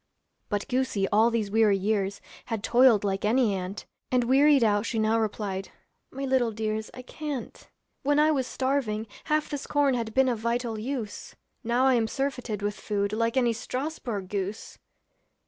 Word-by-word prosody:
But 205 -1 -2
goosey 250 -6 0
all 220 +3 +4
these 220 -4 -1
weary 215 -2 +4
years 200 0 -1 0.2
Had 225 -4 -4
toiled 240 -4 +5
like 195 -1 -1
any 225 0 +3
ant, 190 +1 -5 0.3
And 250 -1 +3
wearied 275 +2 +5
out 205 -2 +3
she 230 0 -3
now 220 +1 +2
replied, 205 -3 -3 0.4
'My 275 +1 -5
little 260 -3 +2
dears, 215 0 -3
I 255 - -8
can't. 290 -1 -6 0.3
'When 290 +1 +2
I 305 +1 +5
was 265 -4 0
starving, 260 -5 -1 0.2
half 305 0 0
this 290 -2 -4
corn 290 -2 +2
Had 230 -3 -3
been 265 0 +4
of 240 -3 0
vital 235 0 -1
use, 235 -2 -5 0.3
Now 240 +3 +2
I 265 - +5
am 230 -2 +2
surfeited 250 -5 -3
with 205 0 -2
food 200 -1 -1
Like 230 +3 0
any 240 -2 +3
Strasbourg 240 -4 -4
goose.' 200 +2 -5
230 Hz, 170 wpm, -27 LUFS, 210-260 Hz, 0.4 s, toiled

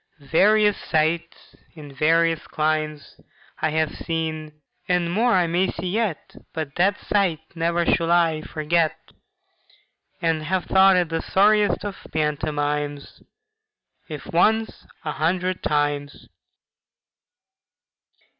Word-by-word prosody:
Various 205 +8 +3
sights 165 +1 -2 0.2
in 145 -3 -11
various 165 +2 +2
climes 155 -1 -2 0.4
I 155 - +2
have 155 0 0
seen, 155 -2 -4 0.3
and 175 -1 +1
more 230 +6 +2
I 180 -2 +3
may 175 +3 +1
see 180 - -4
yet, 215 -5 -2 0.2
But 155 -3 -4
that 200 +3 +2
sight 190 -6 0
never 170 0 0
shall 165 0 +1
I 165 -3 +3
forget, 155 +1 0 1.2
And 165 -2 0
have 185 +2 -1
thought 190 0 +5
it 175 -3 +1
the 165 0 -2
sorriest 205 -1 +2
of 200 -1 -5
pantomimes, 150 -1 -2 0.9
If 150 -2 -7
once, 220 +6 +1 0.2
a 150 - -1
hundred 180 +4 -1
times! 145 -1 -2
165 Hz, 110 wpm, -23 LUFS, 155-185 Hz, 1.2 s, thought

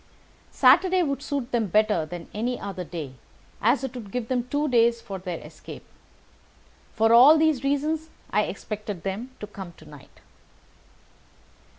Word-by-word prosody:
Saturday 355 +8 +4
would 280 -3 -2
suit 280 -3 -4
them 230 -3 +1
better 210 -4 +2
than 175 +1 -8
any 240 +4 -2
other 195 -2 -5
day, 160 -6 -7 0.5
as 245 +5 +2
it 265 -2 -4
would 235 -5 -8
give 230 +2 -4
them 250 -1 -1
two 290 +3 0
days 235 -2 +3
for 195 -4 -7
their 180 -2 -5
escape. - - -11 1.1
For 225 +1 +3
all 270 +7 +8
these 310 -5 +2
reasons 305 +3 -1 0.2
I 210 +1 +2
expected 205 -2 -6
them 200 +6 -4
to - - -5
come 195 -4 -9
to 155 - -17
night." 150 -2 -15
230 Hz, 155 wpm, -25 LUFS, 195-275 Hz, 1.1 s, all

